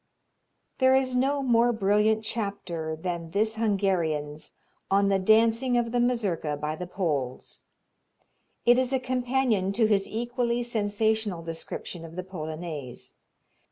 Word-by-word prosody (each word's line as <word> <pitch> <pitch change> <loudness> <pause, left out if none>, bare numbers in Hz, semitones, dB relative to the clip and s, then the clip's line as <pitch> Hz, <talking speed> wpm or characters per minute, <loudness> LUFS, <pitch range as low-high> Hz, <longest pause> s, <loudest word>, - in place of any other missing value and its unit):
There 260 0 +5
is 260 -1 +1
no 275 +2 +1
more 240 -1 +4
brilliant 215 0 +2
chapter 195 -8 -3
than 170 0 -4
this 215 +5 0
Hungarian's 175 -9 -1 0.4
on 200 +1 +3
the 195 -1 +2
dancing 230 +5 +3
of 235 -1 0
the 245 - +1
Mazurka 205 -11 0
by 150 +1 -3
the 180 +2 -6
Poles. 150 -9 -3 1.0
It 240 +1 +6
is 255 0 0
a 265 - +2
companion 250 -5 0
to 225 +1 +3
his 205 -2 +2
equally 240 +1 -1
sensational 215 -4 0
description 165 +1 -6
of 165 0 -10
the 185 - -4
Polonaise. 155 -6 -7
205 Hz, 130 wpm, -27 LUFS, 170-240 Hz, 1.0 s, It